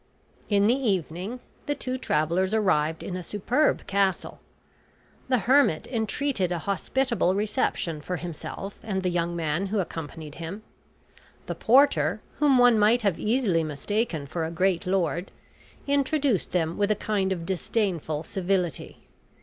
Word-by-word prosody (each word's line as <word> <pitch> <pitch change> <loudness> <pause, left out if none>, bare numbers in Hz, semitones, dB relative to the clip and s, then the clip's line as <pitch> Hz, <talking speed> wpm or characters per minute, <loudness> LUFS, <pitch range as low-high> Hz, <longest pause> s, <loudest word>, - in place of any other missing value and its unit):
In 200 -1 +4
the 230 - +5
evening 200 - -2 0.3
the 290 - 0
two 255 -2 -3
travelers 185 - 0
arrived 165 -7 +1
in 180 - -4
a 185 - -4
superb 225 - 0
castle. 195 -2 0 0.9
The 255 - +4
hermit 260 - +4
entreated 225 -3 -1
a 175 - 0
hospitable 200 - 0
reception 200 - -1
for 180 +4 -3
himself 175 +4 -6
and 190 -3 -3
the 180 - +1
young 170 0 -1
man 165 +3 -1
who 210 +3 -2
accompanied 160 -4 -5
him. 185 +6 -6 0.8
The - - -3
porter, 220 - +4 0.2
whom 285 -3 +5
one 245 -3 +6
might 220 +3 +4
have 195 -5 +1
easily 215 -7 +1
mistaken 160 - -2
for 160 +4 -3
a 160 - -2
great 180 +1 0
lord, 180 -1 0 0.6
introduced 280 - +1
them 165 -1 -1
with 205 0 +2
a 215 - +3
kind 200 -2 -1
of 170 -3 -2
disdainful 175 -5 -1
civility. 180 -3 -2
190 Hz, 140 wpm, -26 LUFS, 170-225 Hz, 0.9 s, one